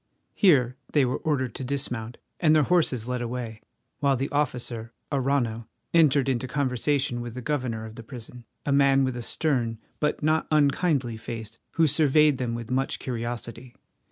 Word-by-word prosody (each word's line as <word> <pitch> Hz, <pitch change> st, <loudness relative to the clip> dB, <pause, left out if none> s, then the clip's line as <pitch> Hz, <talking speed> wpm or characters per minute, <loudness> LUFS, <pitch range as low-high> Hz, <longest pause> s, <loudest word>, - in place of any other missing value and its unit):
Here 135 Hz, -, +4 dB, 0.2 s
they 145 Hz, -3 st, +4 dB
were 125 Hz, -, -1 dB
ordered 135 Hz, -5 st, -1 dB
to -, -, -6 dB
dismount 120 Hz, -4 st, -3 dB, 0.2 s
and 155 Hz, -3 st, +4 dB
their 155 Hz, -, +5 dB
horses 135 Hz, -8 st, +2 dB
led 125 Hz, -1 st, -2 dB
away, 120 Hz, -2 st, -4 dB, 0.4 s
while 140 Hz, -2 st, +2 dB
the 135 Hz, +3 st, -2 dB
officer, 120 Hz, -5 st, -2 dB, 0.2 s
Arrano, 125 Hz, -5 st, 0 dB, 0.3 s
entered 145 Hz, -5 st, +5 dB
into 130 Hz, -1 st, 0 dB
conversation 130 Hz, -1 st, 0 dB
with 120 Hz, -1 st, -6 dB
the 125 Hz, -, -5 dB
governor 125 Hz, -6 st, -2 dB
of 110 Hz, -, -9 dB
the 115 Hz, -, -9 dB
prison, 120 Hz, 0 st, -10 dB, 0.2 s
a 145 Hz, -, 0 dB
man 140 Hz, -1 st, +5 dB
with 130 Hz, -2 st, -1 dB
a 120 Hz, -, -4 dB
stern 120 Hz, -3 st, 0 dB, 0.2 s
but 150 Hz, 0 st, 0 dB
not 155 Hz, +1 st, +2 dB
unkindly 145 Hz, -5 st, +2 dB
face, 115 Hz, 0 st, -7 dB
who 165 Hz, -, +4 dB
surveyed 150 Hz, -1 st, +4 dB
them 120 Hz, -2 st, -1 dB
with 115 Hz, +1 st, -6 dB
much 135 Hz, +1 st, 0 dB
curiosity. 120 Hz, 0 st, -5 dB
130 Hz, 165 wpm, -26 LUFS, 120-145 Hz, 0.4 s, their